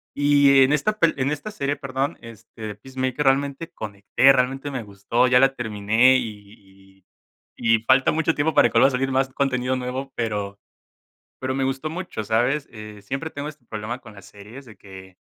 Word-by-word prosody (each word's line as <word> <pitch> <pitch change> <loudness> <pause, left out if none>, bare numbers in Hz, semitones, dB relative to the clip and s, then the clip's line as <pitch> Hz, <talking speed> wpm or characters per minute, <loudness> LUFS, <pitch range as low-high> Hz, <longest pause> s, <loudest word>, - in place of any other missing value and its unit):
Y 145 -1 +5
en 135 +3 +2
esta 215 +9 0
pel 165 - +3
en 135 +1 0
esta 150 +8 -4
serie, 145 -8 -2
perdón, 135 -1 -3
este, 115 -1 -14
de 105 -1 -5
Peacemaker, 130 +4 -4
realmente 140 +4 0
conecté, 105 +5 +2
realmente 135 +2 0
me 130 -4 -5
gustó, 105 +5 0
ya 125 0 +5
la 135 +1 +4
terminé 110 +3 +3
y 100 -4 -10
y - - -65 0.5
y 115 -1 +2
falta 130 +2 +4
mucho 160 +1 0
tiempo 150 +2 0
para 145 - +5
que - - -13
vuelva - - +5
a - - -2
salir 135 +1 -1
más 135 0 +1
contenido 130 -2 -1
nuevo, 130 +2 -5
pero 105 -3 -3 0.8
pero 130 0 -3
me 135 0 -1
gustó 135 +3 -2
mucho, 170 -10 -5
¿sabes? 125 +7 0
Eh, 105 -2 -10
siempre 135 +10 -5
tengo 145 0 -6
este 150 -4 -12
problema 110 +3 -5
con 110 -4 -14
las 100 -2 -14
series, 105 +7 -13
de 110 -6 -15
que 95 -1 -14
130 Hz, 190 wpm, -23 LUFS, 110-140 Hz, 0.8 s, Y